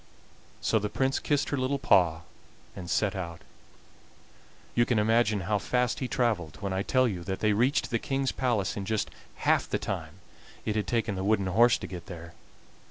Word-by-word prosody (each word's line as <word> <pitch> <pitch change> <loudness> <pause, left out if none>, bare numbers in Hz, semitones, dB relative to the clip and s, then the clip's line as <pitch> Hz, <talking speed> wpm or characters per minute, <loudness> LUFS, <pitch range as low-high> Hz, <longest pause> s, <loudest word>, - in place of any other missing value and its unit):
So 110 - +2
the 105 0 -2
Prince 130 +6 0
kissed 145 -1 0
her 145 - -1
little 130 +2 0
paw 85 -10 +3 0.5
and 90 -3 -7
set 100 0 +1
out. 85 -3 -6 1.3
You 120 - +4
can 120 -1 +1
imagine 110 -1 +3
how 105 +3 0
fast 125 +4 0
he 130 - -2
traveled 110 - 0
when 100 -1 -3
I 95 - 0
tell 130 +5 +3
you 90 -6 -3
that 95 -1 -3
they 105 -1 +2
reached 125 +6 +1
the 115 - +1
King's 135 +1 -1
palace 115 -5 0
in 100 -3 -4
just 110 0 -1 0.3
half - - +3
the - - +1
time 80 0 -4 0.5
it 105 - -1
had 105 -2 -1
taken 115 -3 0
the 95 0 -3
wooden 100 -1 +2
horse 110 +5 +4
to - - -7
get 90 -2 -8
there. 85 -2 -9
105 Hz, 190 wpm, -28 LUFS, 95-120 Hz, 1.3 s, You